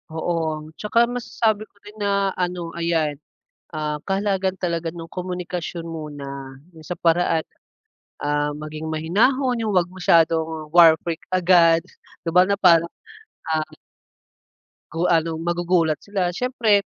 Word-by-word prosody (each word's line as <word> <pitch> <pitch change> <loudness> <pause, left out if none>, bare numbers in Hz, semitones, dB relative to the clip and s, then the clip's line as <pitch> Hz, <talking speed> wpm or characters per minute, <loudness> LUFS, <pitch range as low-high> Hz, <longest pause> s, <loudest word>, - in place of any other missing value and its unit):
Oo, 160 -2 -2 0.2
tsaka 215 +2 +1
masasabi 225 -3 -1
ko - - -48
rin 210 +1 -13
na 200 -1 +1
ano 175 -2 -2
ayan, 160 -4 0 0.5
ah, 150 -1 -2
kahalagahan 195 -1 0
talaga 170 -2 -2
nung 165 -1 -9
komunikasyon 180 -2 -5
muna 140 -4 -7 0.2
yung 155 - -13
sa - - -5
paraan, 170 -1 +2 0.8
ah, 145 0 0
maging 155 +1 -7
mahinahon 230 - +1
yung 215 -3 -1
'wag 180 -1 +2
masyadong 160 -3 +1
war 165 -2 +8
freak 170 -1 -3
agad 170 -2 +4 0.4
di 165 - -2
ba, 180 +2 +5
na 200 - +2
parang 170 -4 +5 0.7
ang 155 -1 -1 1.2
Gawa 165 +1 +2
nung 160 0 -5
magugulat 175 -2 +1
sila 190 -4 -2
siyempre, 230 0 +2
170 Hz, 130 wpm, -22 LUFS, 160-185 Hz, 1.2 s, war